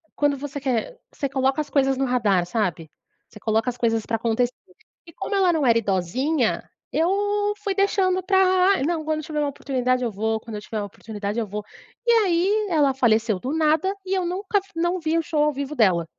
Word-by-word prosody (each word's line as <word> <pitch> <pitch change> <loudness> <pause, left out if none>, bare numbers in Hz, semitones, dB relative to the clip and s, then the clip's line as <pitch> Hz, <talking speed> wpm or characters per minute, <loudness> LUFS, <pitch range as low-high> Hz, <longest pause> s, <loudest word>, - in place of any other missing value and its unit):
quando 290 -1 +1
você 285 +1 -6
quer, 260 - -2
você 280 - -3
coloca 270 +2 +1
as 300 - -7
coisas 270 -2 +2
no 270 - +1
radar, 215 -8 +2
sabe? 175 -5 -2 0.4
Você 215 - -13
coloca 225 +3 +1
as 245 - -5
coisas 225 -2 0
pra 225 - -1
acontecer 235 +2 0 0.5
e 335 - -13
como 410 - -4
ela 370 -3 +3
não 305 -4 +1
era 230 -1 +5
idosinha, 230 - 0 0.2
eu 410 +4 +1
fui 400 - 0
deixando 380 -2 +2
para: 375 -1 +3
"Não, 320 +1 -1
quando 310 0 0
eu - - -6
tiver 305 -1 -3
uma 295 -1 +1
oportunidade 255 -2 -1
eu 235 - -1
vou, 220 +2 -1
quando 220 0 -9
eu - - -7
tiver 215 0 -4
oportunidade 210 +1 -5
eu 225 - -2
vou". 210 +1 -5 0.4
E - - +6
aí, 410 0 +2
ela 290 -5 +3
faleceu 225 -5 +2
do 255 +8 -4
nada 320 +5 +2
e 375 - -2
eu 370 - 0
nunca 390 +4 -1
f 390 - -18
não 345 +2 0
vi 320 0 0
o - - +2
show 300 -1 +1
ao 300 - +2
vivo 280 +2 -4
dela. 185 - +3
275 Hz, 210 wpm, -23 LUFS, 225-345 Hz, 0.5 s, E